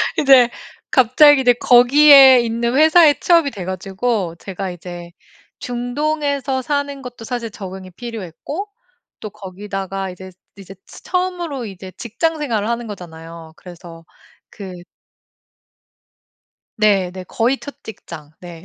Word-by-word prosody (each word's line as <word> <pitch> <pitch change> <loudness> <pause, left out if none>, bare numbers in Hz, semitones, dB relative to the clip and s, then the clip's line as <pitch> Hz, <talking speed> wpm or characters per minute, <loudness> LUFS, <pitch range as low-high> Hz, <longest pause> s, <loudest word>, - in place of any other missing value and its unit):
근데 265 -4 +5 0.4
갑자기 270 +3 +5
이제 250 -1 +4
거기에 265 +2 +7
있는 235 +1 -2
회사에 315 0 +5
취업이 335 -5 +3
돼 195 -6 -8
가지고 190 0 -3
제가 190 -1 -6
이제 175 0 -10 0.5
중동에서 275 +2 -2
사는 285 +1 -3
것도 245 -3 -10
사실 240 -1 -4
적응이 190 -2 -9
필요했고 230 - -7 0.5
또 215 - -7
거기다가 195 -1 -6
이제 185 +1 -11 0.3
이제 195 -1 -12
츠 - - -15
처음으로 350 -8 -3
이제 190 -2 -10
직장 315 +8 -2
생활을 230 -7 -2
하는 235 0 -3
거잖아요. 165 -4 -11
그래서 170 -2 -13 0.4
그 195 -3 -10 2.1
네. 200 -4 +2
네. 185 0 -9
거의 240 +8 -1
첫 285 - -10
직장 160 -8 -11
네. 170 -2 -11
230 Hz, 265 characters per minute, -18 LUFS, 185-275 Hz, 2.1 s, 거기에